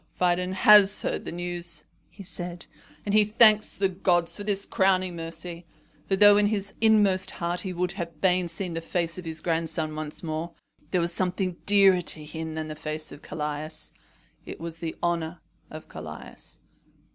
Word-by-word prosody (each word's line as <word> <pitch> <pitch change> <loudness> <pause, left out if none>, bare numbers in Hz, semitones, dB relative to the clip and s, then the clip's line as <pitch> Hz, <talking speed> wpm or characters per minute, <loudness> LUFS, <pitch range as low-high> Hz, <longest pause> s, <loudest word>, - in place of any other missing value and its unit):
"Phidon 180 +1 +1
has 205 +1 +6
heard - - -2
the - - -5
news," 175 -2 -4 0.3
he 200 - -12
said, 175 -1 -7 0.4
"and 205 - -1
he 215 0 +6
thanks 215 0 +5
the 195 - +1
gods 180 -2 0
for 205 - -3
this 200 -1 0
crowning 185 -2 +1
mercy. 165 +1 -6 0.4
For 195 - +2
though 205 +1 +7
in 205 0 +4
his 205 -1 -2
inmost 205 -4 +4
heart 175 +1 -1
he 190 - -4
would 180 0 -2 0.3
fain 180 +1 +2
have - - -6
seen 175 0 -4
the 165 - -3
face 170 +1 -2
of 180 - -9
his 160 -1 -5
grandson 160 -2 -2
once 155 +1 -6
more, 160 +1 -4 0.4
there 180 0 +1
was 170 0 -1
something 185 0 -1
dearer 195 -2 +5
to 155 -2 -2
him 160 +1 -6
than 160 0 -4
the 155 - -6
face 155 0 -5
of 145 - -11
Callias 150 +1 -4 0.5
it - - -9
was 165 0 -6
the 165 -2 -5
honour 170 -1 -1 0.3
of - - -10
Callias." - - -9
175 Hz, 180 wpm, -26 LUFS, 165-195 Hz, 0.5 s, though